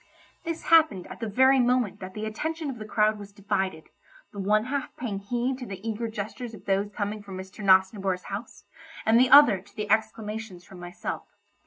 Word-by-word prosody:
This 330 -1 -4
happened 315 - +5
at - - -9
the 225 - -3
very 260 +5 +5
moment 245 -4 +1
that 185 0 -9
the 215 0 -4
attention 310 +7 -3
of 240 - -9
the 215 - -6
crowd 215 0 +2
was 200 0 -10
divided, 190 -5 -3 0.4
the 205 - -7
one 210 +2 +2
half 280 +4 -4
paying 215 -6 -4
heed 245 +5 -2
to 250 - -7
the 195 +2 -7
eager 225 +1 -2
gestures 220 +2 -6
of - - -15
those 200 +1 +1
coming 205 +1 -4
from 195 -2 -9
Mr. 190 +3 -9
Nosnibor's 190 -1 +3
house, 200 +5 -7 0.4
and 225 +2 +5
the 255 +1 +4
other 275 -9 +8
to - - -22
the 210 -1 -4
exclamations 220 -3 -2
from 190 - -13
myself. 175 0 -6
215 Hz, 195 wpm, -26 LUFS, 195-245 Hz, 0.4 s, other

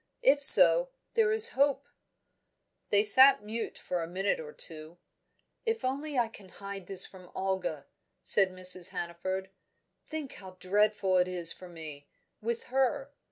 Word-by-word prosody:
If 285 +2 +2
so, - - +6 0.2
there 445 -2 0
is 440 +1 +4
hope." 280 - -1 1.0
They 205 0 +3
sat 260 +2 +5
mute 225 +2 -6
for 180 -1 -6
a 165 - -6
minute 190 +3 -3
or 150 -2 -10
two. 155 +2 -3 0.7
"If 455 - -4
only 280 +2 -5
I 240 -2 0
can 205 -4 -17
hide 195 -1 -11
this 195 -2 +6
from 185 -2 -14
Olga," 185 -6 -5 0.4
said 195 -2 +2
Mrs. 185 -1 +3
Hannaford. 185 +3 -7 0.6
"Think 310 -4 -8
how 185 -2 -14
dreadful 200 0 -1
it 180 - 0
is 175 -2 +4
for 180 - -14
me, 155 -4 -11 0.3
with 235 +1 -5
her! 270 +1 -2
195 Hz, 150 wpm, -28 LUFS, 180-265 Hz, 1.0 s, so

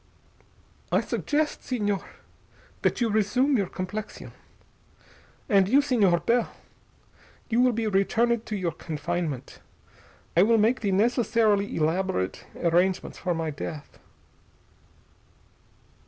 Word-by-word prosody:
"I - - +4
suggest, 300 +1 -1
Señor, 205 -6 -2 0.8
that - - 0
you 235 - +2
resume 245 +7 +2
your 200 -6 +1
complexion. 200 +5 -6 1.2
And 195 -4 +3
you, 270 +5 +5
Señor 205 -12 +2
Bell, 240 0 +2 1.0
you 235 +2 +3
will 250 0 +4
be 230 -1 -2
returned 220 +3 +1
to 215 - -3
your 180 -4 -1
confinement. 160 -3 -4 0.8
I 170 - +6
will 225 +4 +4
make 225 +4 +2
the 205 -3 -1
necessarily 215 -1 +2
elaborate 160 - -1 0.2
arrangements 175 +2 +1
for 180 -2 -1
my 160 -1 -2
death." 145 +1 -8
205 Hz, 110 wpm, -26 LUFS, 175-235 Hz, 1.2 s, I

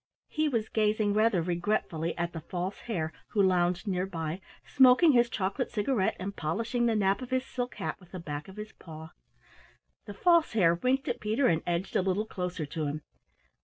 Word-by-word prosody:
He 310 0 0
was 230 -5 -1
gazing 215 -1 +1
rather 215 -4 +3
regretfully 170 -2 -1
at 170 0 -2
the 165 - -4
False 180 +4 -4
Hare 160 -8 -2 0.2
who 205 - +3
lounged 180 +1 +2
near 185 -1 0
by, 165 0 -4 0.2
smoking 265 +5 +6
his 240 -2 +4
chocolate 210 +5 -2
cigarette 215 -2 0
and 195 +2 -5
polishing 230 +10 -1
the 230 - +2
nap 195 +2 +2
of 255 - -7
his 260 0 0
silk 250 -1 -4
hat - - -4
with 180 -2 -19
the 185 - -6
back 150 -2 -6
of 190 +1 -12
his 210 +1 -7
paw. 160 -1 -11 1.0
The 205 - -7
False 340 - +3
Hare 175 -7 +4
winked 255 +9 0
at - - -2
Peter 220 +6 +1
and 165 -8 +3
edged 175 +2 -2
a - - +4
little 190 +3 0
closer 180 -6 -4
to 150 +1 -3
him. 150 +1 -4
195 Hz, 195 wpm, -29 LUFS, 170-230 Hz, 1.0 s, smoking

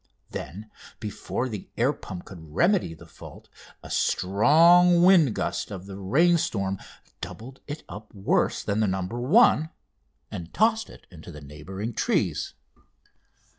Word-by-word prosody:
Then 100 +10 -8 0.3
before 110 +4 -4
the 105 -6 -7
air 125 +5 +2
pump 90 -10 -9
could 95 - -11 0.2
remedy 175 - +2
the - - -15
fault, - - -14 0.3
a - - -10
strong 170 - +4
wind 175 - +5
gust - - -3
of 95 -3 -8
the 100 -1 -9
rainstorm 100 - +1 0.4
doubled 130 +4 -9
it 150 +1 -6
up 105 +1 -10
worse 100 -2 0
than 100 +1 -1
the 110 - +2
"No. 95 0 -1
1," 145 - +3 0.6
and 90 -5 -7
tossed 220 0 +2
it - - -15
into 85 0 -11
the 75 - -10
neighbouring 90 +10 -7
trees. - - -1
110 Hz, 135 wpm, -25 LUFS, 95-160 Hz, 0.6 s, wind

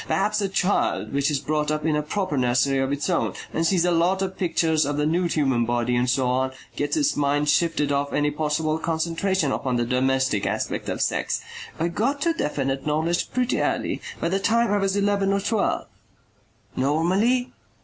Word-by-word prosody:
Perhaps 210 +2 +1
a 195 - 0
child 195 -5 0
which 140 +1 +1
is 150 - +1
brought 150 +2 -1
up 155 0 -1
in 155 -2 +2
a 150 - +1
proper 170 +1 -2
nursery 130 +1 +2
of 135 +1 0
its 145 0 -2
own 180 -3 0 0.2
and 165 +1 +1
sees 180 -1 +2
a 180 - +2
lot 180 +3 +2
of 190 0 -4
pictures 165 -4 +1
of 145 +1 -2
the 150 - +1
nude 170 +2 +1
human 135 -6 +2
body, 120 +1 0
and 120 +1 +1
so 130 0 +1
on, 130 +1 0 0.2
gets 145 - -1
its 295 -1 +2
mind 145 +1 +1
shifted 150 -1 +2
off 140 0 0
any 145 0 +1
possible 155 +1 -1
concentration 165 0 0
upon 130 -2 -1
the 120 0 +1
domestic 130 -3 +1
aspect - - -2
of - - -1
sex. - - -1 0.4
I 165 - +1
got 240 +11 -1
to 335 +2 +2
definite 135 - -2
knowledge 160 +3 0
pretty 250 0 0
early. - - -1 0.2
By 170 - -1
the 195 +2 0
time 230 +2 +2
I - - +3
was 195 0 0
eleven 200 -1 +1
or 200 - +2
twelve." 205 +1 0 0.9
"Normally?" 185 - +1
155 Hz, 195 wpm, -24 LUFS, 140-190 Hz, 0.9 s, I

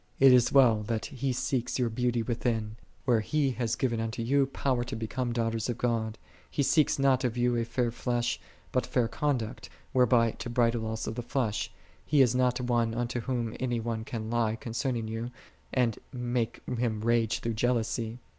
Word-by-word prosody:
56. 135 -1 +7
It - - +9
is 125 -2 +4
well 120 -6 +5
that 115 -2 -1
He 135 0 -2
seeks 125 0 -1
your 125 -3 +1
beauty 120 0 0
within, 110 -2 -1 0.3
where 120 -3 +4
He 140 +4 +1
hath 120 -2 -1
given 120 -3 0
unto 115 +1 -2
you 135 +3 +3
power 130 -2 0
to 120 - -5
become 120 +2 -2
daughters 115 -1 -1
of 120 - -2
God:4 115 -2 0 0.3
He 140 - 0
seeks 155 +2 +3
not 135 -1 +3
of 125 -1 -1
you 120 0 +2
a 115 - +1
fair 120 0 -1
flesh, 120 0 -1 0.3
but 125 - 0
fair 125 -3 +1
conduct, 115 -1 -2 0.2
whereby 120 -2 +4
to 120 - -7
bridle 115 -1 +1
also 110 0 -3
the 120 +2 -4
flesh. 120 -4 -1 0.3
He 145 -2 +5
is 125 - +2
not 125 0 +2
one 120 -2 +1
unto 120 +1 -1
Whom 120 -2 -2
any 120 -2 0
one 115 -1 -3
can 110 -1 -5
lie 115 -2 +1
concerning 120 -1 -2
you, 115 +2 -4 0.4
and 120 -4 +1
make 120 -2 -2
him 120 -3 -1
rage 115 -1 +2
through 115 - -2
jealousy. 115 0 0
120 Hz, 185 wpm, -29 LUFS, 115-125 Hz, 0.4 s, It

